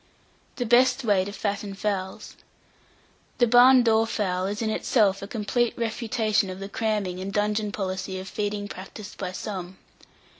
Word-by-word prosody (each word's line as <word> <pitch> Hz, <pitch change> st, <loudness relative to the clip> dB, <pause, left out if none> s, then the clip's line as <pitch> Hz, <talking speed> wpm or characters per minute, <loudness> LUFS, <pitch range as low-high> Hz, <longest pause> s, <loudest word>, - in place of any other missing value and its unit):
THE 245 Hz, -, -2 dB
BEST 250 Hz, +3 st, +4 dB
WAY 200 Hz, -4 st, +3 dB
TO 200 Hz, -, -5 dB
FATTEN 205 Hz, -1 st, -3 dB
FOWLS. 195 Hz, -2 st, -3 dB, 1.0 s
The 240 Hz, -, +5 dB
barn 245 Hz, +2 st, +7 dB
door 225 Hz, -1 st, +3 dB
fowl 185 Hz, -4 st, -1 dB
is 205 Hz, +3 st, -3 dB
in 220 Hz, -, 0 dB
itself 205 Hz, -4 st, +2 dB
a 200 Hz, -, -6 dB
complete 230 Hz, +2 st, -1 dB
refutation 225 Hz, -3 st, 0 dB
of 185 Hz, 0 st, -7 dB
the 195 Hz, 0 st, -6 dB
cramming 205 Hz, -4 st, -1 dB
and 190 Hz, +1 st, -4 dB
dungeon 210 Hz, +1 st, 0 dB
policy 190 Hz, -1 st, -3 dB
of 190 Hz, -, -8 dB
feeding 205 Hz, 0 st, -3 dB
practised 200 Hz, +2 st, -10 dB
by 185 Hz, -2 st, -3 dB
some. 185 Hz, -2 st, -6 dB
205 Hz, 155 wpm, -25 LUFS, 195-225 Hz, 1.0 s, barn